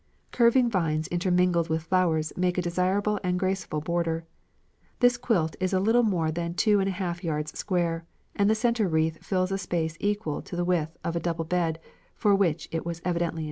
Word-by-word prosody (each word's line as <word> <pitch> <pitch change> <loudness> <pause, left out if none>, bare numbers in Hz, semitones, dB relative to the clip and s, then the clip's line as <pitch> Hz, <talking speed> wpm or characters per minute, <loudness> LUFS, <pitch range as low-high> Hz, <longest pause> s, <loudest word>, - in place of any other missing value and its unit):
Curving 240 +1 +4
vines 160 -7 0
intermingled 175 -1 +2
with 160 0 -1
flowers 165 -3 +1
make 180 0 0
a - - +2
desirable 190 +4 0
and 180 0 0
graceful 185 -5 -1
border. 165 0 -1 0.7
This 245 -1 +5
quilt 220 -10 0
is 185 0 -1
a 190 - +3
little 225 +5 +4
more 175 -8 +1
than 170 +1 -3
two 210 +1 +3
and 195 0 +1
a - - 0
half 180 -1 -4
yards 150 -2 -2
square, 170 -3 -1 0.3
and 200 0 +3
the 220 - +4
central 230 -3 +1
wreath 160 0 0
fills 185 -1 0
a 195 - -1
space 170 -3 -2
equal 205 -7 -1
to - - -8
the 175 0 -1
width 165 -3 0
of 170 - -2
a - - +1
double 165 -1 -2
bed, 165 -1 0 0.4
for 205 -2 +3
which 175 -5 +1
it 165 0 -2
was 170 -1 -4
evidently 175 -1 +1
intended. 165 - -6
175 Hz, 200 wpm, -27 LUFS, 165-195 Hz, 0.7 s, This